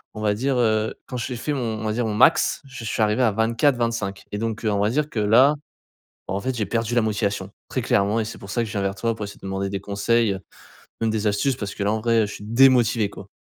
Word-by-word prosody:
on 110 Hz, -, -6 dB
va 105 Hz, -1 st, +2 dB
dire, 130 Hz, +4 st, 0 dB
heu, 110 Hz, -2 st, +1 dB
quand 125 Hz, -, -5 dB
j'ai 125 Hz, +1 st, -3 dB
fait 150 Hz, +4 st, -2 dB
mon 115 Hz, -5 st, -2 dB
on -, -, -4 dB
va 110 Hz, -, 0 dB
dire 120 Hz, +1 st, -1 dB
mon 105 Hz, -, -2 dB
max, 130 Hz, +8 st, +4 dB
je 135 Hz, -3 st, -9 dB
suis 110 Hz, -, -2 dB
arrivé 105 Hz, +4 st, +1 dB
à 110 Hz, -, +4 dB
24-25 115 Hz, -2 st, 0 dB
et 105 Hz, -, -3 dB
donc, 115 Hz, 0 st, -3 dB
heu, 110 Hz, -, +2 dB
on 100 Hz, -, 0 dB
va 105 Hz, +1 st, +2 dB
dire 150 Hz, +3 st, 0 dB
que 115 Hz, -, -3 dB
là, 120 Hz, +8 st, +5 dB, 0.7 s
en 95 Hz, -, -2 dB
fait, 130 Hz, +4 st, -2 dB
j'ai 105 Hz, -, 0 dB
perdu 115 Hz, +1 st, -1 dB
la 120 Hz, -, +4 dB
motivation. 105 Hz, -1 st, -1 dB, 0.2 s
Très -, -, -1 dB
clairement 100 Hz, +3 st, +2 dB
et -, -, -2 dB
c'est 110 Hz, -, -7 dB
pour 100 Hz, -, -11 dB
ça 120 Hz, -, 0 dB
que 115 Hz, -, -4 dB
je -, -, -7 dB
viens 100 Hz, -, -1 dB
vers 100 Hz, 0 st, -1 dB
toi 115 Hz, +3 st, -1 dB
pour 105 Hz, -, -5 dB
essayer 100 Hz, -, -9 dB
de -, -, -23 dB
te -, -, -10 dB
demander 95 Hz, 0 st, -2 dB
des 95 Hz, -1 st, -4 dB
conseils, 105 Hz, +2 st, +1 dB
heu, 95 Hz, -, -6 dB, 0.6 s
même 115 Hz, -, +1 dB
des 110 Hz, -1 st, 0 dB
astuces 105 Hz, +6 st, +1 dB
parce 100 Hz, -5 st, -5 dB
que 100 Hz, -, -3 dB
là, 100 Hz, -, +1 dB
en 110 Hz, -, -1 dB
vrai, 115 Hz, -2 st, +3 dB
je 105 Hz, -, -7 dB
suis -, -, -9 dB
démotivé, 115 Hz, -3 st, +4 dB
quoi. 100 Hz, -, -11 dB
110 Hz, 280 wpm, -23 LUFS, 105-120 Hz, 0.7 s, là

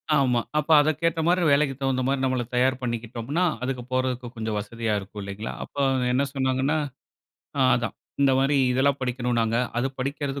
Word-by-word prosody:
ஆமா, 125 Hz, -4 st, +3 dB, 0.2 s
அப்ப 150 Hz, +1 st, -1 dB
அத 155 Hz, -, +2 dB
கேட்ட 165 Hz, -1 st, +1 dB
மாரி 180 Hz, +1 st, +3 dB
வேலைக்கு 140 Hz, -1 st, +3 dB
தகுந்த 135 Hz, -1 st, 0 dB
மாரி 135 Hz, 0 st, +1 dB
நம்மள 130 Hz, -2 st, 0 dB
தயார் 130 Hz, +1 st, +3 dB
பண்ணிக்கிட்டோம்ன்னா, 120 Hz, +6 st, -2 dB, 0.2 s
அதுக்கு 125 Hz, -1 st, -2 dB
போறதுக்கு 130 Hz, -1 st, -1 dB
கொஞ்சம் 110 Hz, -1 st, -2 dB
வசதியா 110 Hz, +1 st, -3 dB
இருக்கும் 100 Hz, +1 st, -9 dB
இல்லைங்களா? 100 Hz, +3 st, -5 dB
அப்ப 140 Hz, -, -8 dB, 0.3 s
என்ன 130 Hz, +3 st, +2 dB
சொன்னாங்கன்னா, 135 Hz, +2 st, +1 dB, 0.8 s
ஆ -, -, +2 dB, 0.2 s
அதான் 115 Hz, -1 st, -3 dB, 0.3 s
இந்த 135 Hz, -1 st, +5 dB
மாரி 140 Hz, +2 st, +2 dB, 0.2 s
இதெல்லாம் 135 Hz, +2 st, +2 dB
படிக்கணும்னாங்க, 120 Hz, -3 st, 0 dB, 0.2 s
அது 135 Hz, +2 st, +1 dB
படிக்றது 140 Hz, +1 st, -3 dB
130 Hz, 160 wpm, -25 LUFS, 120-140 Hz, 0.8 s, இந்த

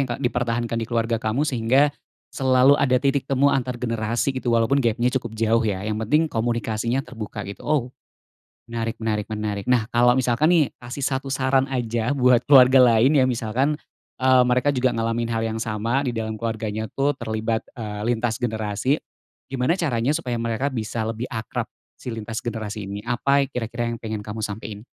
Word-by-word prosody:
yang 135 Hz, -, 0 dB
dipertahankan 120 Hz, -1 st, -1 dB
di 115 Hz, -, -3 dB
keluarga 115 Hz, -1 st, 0 dB
kamu 115 Hz, +7 st, 0 dB
sehingga 135 Hz, +2 st, +2 dB, 0.4 s
selalu 130 Hz, +1 st, +4 dB
ada 130 Hz, -2 st, +3 dB
titik 140 Hz, 0 st, 0 dB
temu 140 Hz, +1 st, +3 dB
antar 125 Hz, -2 st, -1 dB
generasi 115 Hz, +2 st, -1 dB
gitu, 120 Hz, -2 st, -1 dB
walaupun 115 Hz, +5 st, +3 dB
gapnya 120 Hz, 0 st, +1 dB
cukup 115 Hz, -3 st, -8 dB
jauh 115 Hz, +1 st, +2 dB
ya, 100 Hz, -2 st, -2 dB
yang 105 Hz, 0 st, -1 dB
penting 150 Hz, +9 st, +2 dB
komunikasinya 115 Hz, +1 st, -1 dB
terbuka, 110 Hz, -4 st, -7 dB
gitu. 100 Hz, -, -9 dB
Ow, 150 Hz, -3 st, +2 dB, 0.9 s
menarik 115 Hz, -1 st, -3 dB
menarik 110 Hz, -2 st, -2 dB
menarik. 105 Hz, -2 st, -3 dB
Nah 120 Hz, -4 st, +3 dB
kalau 120 Hz, +1 st, +5 dB
misalkan 130 Hz, +4 st, +2 dB
nih, 170 Hz, -4 st, +5 dB, 0.2 s
kasih 125 Hz, +3 st, -5 dB
1 135 Hz, 0 st, -2 dB
saran 130 Hz, 0 st, +2 dB
aja 120 Hz, -1 st, -1 dB
buat 125 Hz, -2 st, +4 dB
keluarga 130 Hz, -2 st, +8 dB, 0.2 s
lain 130 Hz, +7 st, +4 dB
ya, 130 Hz, -, +4 dB
misalkan, 125 Hz, +5 st, 0 dB, 0.5 s
eee, 130 Hz, -1 st, +6 dB
mereka 125 Hz, +3 st, +2 dB
juga 130 Hz, -1 st, +2 dB
ngalamin 115 Hz, +1 st, -1 dB
hal 115 Hz, -1 st, -1 dB
yang 110 Hz, 0 st, -2 dB
sama 115 Hz, +5 st, -1 dB
di 120 Hz, -, -1 dB
dalam 110 Hz, -1 st, -3 dB
keluarganya 110 Hz, -1 st, -3 dB
tuh 140 Hz, +1 st, +2 dB
terlibat, 110 Hz, -1 st, -2 dB
eee, 105 Hz, -3 st, -5 dB
lintas 115 Hz, 0 st, -2 dB
generasi. 110 Hz, +4 st, 0 dB, 0.5 s
Gimana 135 Hz, +6 st, +1 dB
caranya 135 Hz, -7 st, 0 dB
supaya 125 Hz, -7 st, -3 dB
mereka 115 Hz, +3 st, -1 dB
bisa 110 Hz, -1 st, -3 dB
lebih 115 Hz, +2 st, -4 dB
akrab 110 Hz, -2 st, -4 dB, 0.3 s
si 125 Hz, -, -7 dB
lintas 110 Hz, 0 st, -5 dB
generasi 110 Hz, -3 st, -5 dB
ini? 100 Hz, +2 st, -6 dB
Apa 140 Hz, +3 st, +2 dB
yang -, -, -9 dB
kira-kira 120 Hz, 0 st, -3 dB
yang 115 Hz, 0 st, -4 dB
pengen 110 Hz, -1 st, -3 dB
kamu 110 Hz, +1 st, -6 dB
sampein? 105 Hz, +1 st, -6 dB
120 Hz, 175 wpm, -23 LUFS, 110-130 Hz, 0.9 s, keluarga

